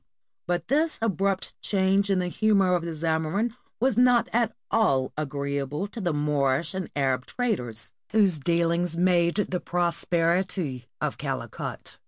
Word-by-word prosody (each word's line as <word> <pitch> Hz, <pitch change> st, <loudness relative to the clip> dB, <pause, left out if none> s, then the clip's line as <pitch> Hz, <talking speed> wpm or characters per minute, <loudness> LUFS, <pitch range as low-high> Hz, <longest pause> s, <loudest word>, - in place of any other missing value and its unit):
But 175 Hz, 0 st, -1 dB
this 310 Hz, +5 st, +1 dB
abrupt 195 Hz, -3 st, -1 dB
change 195 Hz, 0 st, +2 dB
in 195 Hz, -, +3 dB
the 180 Hz, -1 st, 0 dB
humor 195 Hz, 0 st, +3 dB
of 175 Hz, -2 st, +1 dB
the 170 Hz, -1 st, -4 dB
Zamorin 160 Hz, +8 st, 0 dB, 0.3 s
was 245 Hz, -1 st, +2 dB
not 245 Hz, -1 st, +4 dB
at 235 Hz, 0 st, +2 dB, 0.2 s
all 135 Hz, -13 st, +2 dB
agreeable 140 Hz, +2 st, -2 dB
to 225 Hz, -, -7 dB
the 175 Hz, -3 st, 0 dB
Moorish 145 Hz, +1 st, +1 dB
and 190 Hz, -2 st, -4 dB
Arab 130 Hz, -2 st, 0 dB
traders, 125 Hz, -, -2 dB, 0.2 s
whose 200 Hz, -7 st, +4 dB
dealings 170 Hz, +2 st, +1 dB
made 175 Hz, -1 st, +3 dB
the 185 Hz, -3 st, 0 dB
prosperity 170 Hz, -5 st, 0 dB
of -, -, -2 dB
Calicut. -, -, -5 dB
175 Hz, 140 wpm, -26 LUFS, 150-200 Hz, 0.3 s, not